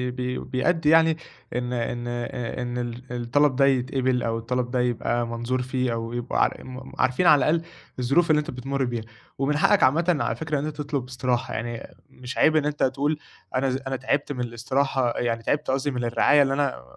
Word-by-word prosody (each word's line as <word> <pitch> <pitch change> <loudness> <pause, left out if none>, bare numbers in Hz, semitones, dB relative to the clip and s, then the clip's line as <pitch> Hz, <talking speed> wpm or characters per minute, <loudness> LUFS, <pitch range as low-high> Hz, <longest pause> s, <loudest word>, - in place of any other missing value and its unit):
ب 125 0 -4
بيأدّي 150 +4 +2
يعني 160 0 +5 0.4
إن 125 0 -2
إن 120 0 -2
أ 120 0 -4
إن 120 0 -3
ال 120 0 -4
الطلَب 130 +4 +2
ده 135 +1 +4
يتقبِل 130 -1 +1
أو 115 -1 -1
الطلَب 120 +2 -2
ده 125 - 0
يبقى 120 -1 0
منظور 120 +2 -2
فيه, 125 -1 -1
أو 115 0 -4
يبقى 120 0 0
ع - - +2
م 130 0 -9
عارفين 130 +8 +2
على 150 -2 +7
الأقل 165 +1 +2 0.4
الظروف 140 +8 +2
اللي 155 -1 +5
أنت 150 - -4
بتمُرّ 135 +2 -2
بيها، 120 -2 -3 0.3
ومن 140 +2 +1
حقّك - - +4
عامةً 165 +5 +3
على - - 0
فكرة 155 -3 -2
إن 145 - -3
أنت 155 -1 -5
تطلُب 145 -4 -3
إستراحة، 125 0 -1
يعني 115 0 -5 0.2
مش 125 0 -8
عيب 155 - +4
إن 155 -2 +3
أنت 150 0 -1
تقول 145 +3 +1 0.4
أنا 130 +1 +2
ز 130 - 0
أنا 135 - -1
تعِبت 140 +3 -1
من 125 - -3
الإستراحة، 125 +1 0
يعني 115 -1 -1
تعِبت 145 +1 0
قصدي 135 +2 0
من 125 -2 -3
الرعاية 120 +5 +4
اللي 135 -1 +2
أنا 140 - -1
130 Hz, 200 wpm, -25 LUFS, 120-145 Hz, 0.4 s, على